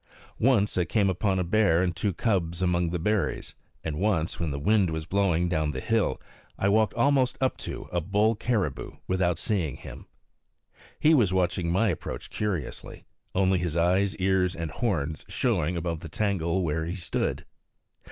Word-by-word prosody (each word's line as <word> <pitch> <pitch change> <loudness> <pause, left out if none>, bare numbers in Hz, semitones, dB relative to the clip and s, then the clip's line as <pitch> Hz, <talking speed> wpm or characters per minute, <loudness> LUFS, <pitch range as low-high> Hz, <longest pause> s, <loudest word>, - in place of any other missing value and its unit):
Once 105 -6 +3
I 90 - +2
came 100 +1 +2
upon 95 +1 0
a 90 - +1
bear 90 -2 +3
and 90 -2 -1
two 100 +3 0
cubs 90 -3 -1
among 90 -1 +1
the 90 - -2
berries; 105 +3 -1 0.3
and 75 -2 -3
once, 95 -5 0
when 85 -3 -1
the 70 - -3
wind 95 +5 +2
was 80 -1 -3
blowing 90 -2 +1
down 80 -3 0
the - - -3
hill, 115 -2 0 0.4
I 100 - +1
walked 110 +1 +2
almost 130 +1 +2
up 130 -1 +1
to - - -7
a 85 - 0
bull 105 +6 +2
caribou 105 - -2
without 90 -3 +1
seeing 85 - -1
him. - - -11 0.9
He 155 - +5
was 110 - +3
watching 90 -2 0
my 110 +5 +2
approach 85 - -5
curiously, 95 -9 -4 0.3
only 95 -1 +3
his 85 -2 -2
eyes, 95 +3 +2
ears, 95 -1 +1
and 80 -2 -4
horns 80 - -2
showing 85 +4 0
above 85 -1 -2
the 80 - -9
tangle 95 -1 0
where 80 -1 -1
he 85 +2 -4
stood. 90 -4 -2
90 Hz, 170 wpm, -27 LUFS, 85-105 Hz, 0.9 s, He